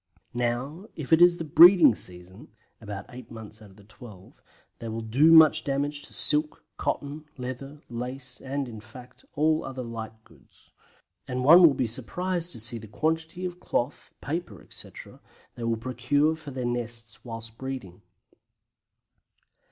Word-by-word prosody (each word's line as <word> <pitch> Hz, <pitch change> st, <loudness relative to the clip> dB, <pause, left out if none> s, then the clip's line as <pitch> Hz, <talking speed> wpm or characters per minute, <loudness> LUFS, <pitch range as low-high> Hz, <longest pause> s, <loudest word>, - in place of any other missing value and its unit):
Now, 125 Hz, -, -3 dB
if 155 Hz, 0 st, -2 dB
it 160 Hz, -, +5 dB
is 175 Hz, 0 st, +6 dB
the 165 Hz, -, -4 dB
breeding 170 Hz, -, +8 dB
season 90 Hz, +1 st, -8 dB, 0.3 s
(about 105 Hz, -2 st, -7 dB
eight 120 Hz, -1 st, -11 dB
months 110 Hz, -1 st, -10 dB
out 105 Hz, -, -14 dB
of 95 Hz, -, -19 dB
the 105 Hz, -, -18 dB
twelve) 105 Hz, -3 st, -15 dB, 0.4 s
they 115 Hz, -, -7 dB
will 115 Hz, 0 st, -4 dB
do 135 Hz, +9 st, +4 dB
much 160 Hz, -1 st, +7 dB
damage 145 Hz, +1 st, -1 dB
to -, -, -11 dB
silk, 150 Hz, +1 st, 0 dB
cotton, 145 Hz, +2 st, -4 dB
leather, 135 Hz, +3 st, -7 dB
lace, 125 Hz, +1 st, -4 dB
and, 135 Hz, 0 st, -3 dB
in 110 Hz, -3 st, -9 dB
fact, 120 Hz, +3 st, -14 dB
all 155 Hz, +2 st, +2 dB
other 130 Hz, -1 st, -6 dB
light 110 Hz, -1 st, -8 dB
goods. 75 Hz, -9 st, -24 dB, 0.6 s
And 125 Hz, 0 st, -3 dB
one 165 Hz, +7 st, +8 dB
would 140 Hz, -4 st, 0 dB
be 130 Hz, -, +1 dB
surprised 170 Hz, +9 st, -2 dB
to 120 Hz, -, -3 dB
see 115 Hz, +1 st, +3 dB
the 110 Hz, -, -11 dB
quantity 160 Hz, -, -2 dB
of 180 Hz, 0 st, -6 dB
cloth, 125 Hz, -3 st, -3 dB
paper, 145 Hz, -, -5 dB
etc., -, -, -10 dB, 0.3 s
they 120 Hz, -, -6 dB
will 115 Hz, -1 st, 0 dB
procure 130 Hz, +6 st, 0 dB
for 155 Hz, -2 st, -11 dB
their 130 Hz, -2 st, -5 dB
nests 115 Hz, -2 st, -4 dB
whilst 115 Hz, -1 st, -7 dB
breeding. 125 Hz, -9 st, -7 dB
125 Hz, 160 wpm, -26 LUFS, 115-150 Hz, 0.6 s, breeding